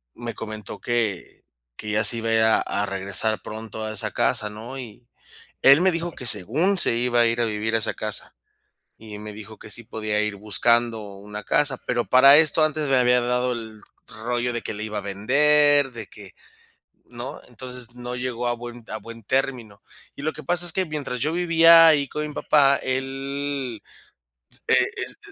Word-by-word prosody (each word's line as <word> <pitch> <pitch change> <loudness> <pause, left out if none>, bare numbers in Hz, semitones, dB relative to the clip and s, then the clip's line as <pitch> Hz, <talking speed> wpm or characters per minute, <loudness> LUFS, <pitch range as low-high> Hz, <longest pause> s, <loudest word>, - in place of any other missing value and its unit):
me 120 0 -6
comentó 110 -2 -8
que 115 -6 -3 0.3
que 105 - -6
ya 105 +1 +1
se 115 +2 +4
iba 115 0 -3
a - - +1
ir 110 - +3
a 110 0 +4
a 100 - -2
regresar 100 +3 0
pronto 110 0 -7
a 110 - -4
esa 110 - +1
casa, 105 - 0
¿no?, 115 +5 -9
y 120 -1 -11 0.6
él 140 +4 +7
me 190 +1 +3
dijo 170 0 -3
que 130 - -8
según 120 - +2
se 115 - +4
iba 120 0 +1
a - - +4
ir 115 +1 0
a - - +2
vivir 110 +1 -2
a - - +2
esa 110 - 0
casa, 110 -1 -1 0.6
y 110 -2 -10
me 105 0 -8
dijo 110 +1 -11
que 110 - -12
sí 120 - -8
podía 110 -2 -2
ir 105 -1 -3
buscando 115 +3 +1 0.2
una 105 +1 -9
casa, 145 -2 +1
pero 120 -1 -1
para 135 +3 +7
esto 155 0 +4
antes 155 -1 -1
me 135 - +3
había 125 0 +3
hablado 125 +1 0
el 110 -2 -8 0.2
rollo 120 +2 -3
de: 120 - -4
"Que - - -5
la 105 0 -4
iba 105 -1 -4
a - - -2
vender, 145 +8 +3
de 115 -3 -8
que", 100 -3 -12 0.7
¿no?, - - -8
entonces 125 -2 -6
no 125 0 -6
llegó 125 -1 -3
a 120 - 0
buen 120 0 -10
a 110 - -4
buen 115 +2 -12
término, 120 -3 -2 0.4
y - - -9
lo 155 +2 -1
que 155 - -10
pasa 175 +4 +2
es 170 - +4
que 190 - +1
mientras 145 -6 -5
yo 150 +5 0
vivía 165 -1 +6
ahí 145 -3 +3
con 150 0 -4
mi 150 - -9
papá, 140 -2 +3
él 135 -1 -4 0.9
e - - +3 0.2
es - - -5
120 Hz, 200 wpm, -23 LUFS, 110-140 Hz, 0.9 s, él